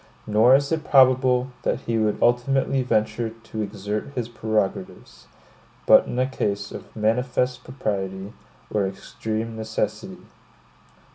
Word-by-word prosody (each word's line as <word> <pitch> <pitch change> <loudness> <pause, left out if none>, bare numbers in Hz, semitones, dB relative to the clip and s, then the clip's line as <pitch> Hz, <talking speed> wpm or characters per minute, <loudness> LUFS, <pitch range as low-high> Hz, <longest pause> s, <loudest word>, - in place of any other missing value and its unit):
Nor 110 +5 +5
is 140 +2 0
it 160 -1 0
probable, 130 -1 +4
that - - -1
he 115 -1 -1
would 105 -1 +1
ultimately 135 +2 +2
venture 110 -1 0
to 115 -1 -8
exert 105 0 -4
his 120 -2 -3
prerogatives, 110 -4 -3 0.6
but - - +6
in - - -4
a 130 - +3
case 100 -6 -3
of - - -10
manifest 125 +3 0
propriety, 100 -5 -4 0.4
or 100 -2 +1
extreme 110 +3 -5
necessity. 110 0 -4
115 Hz, 125 wpm, -23 LUFS, 105-125 Hz, 0.6 s, but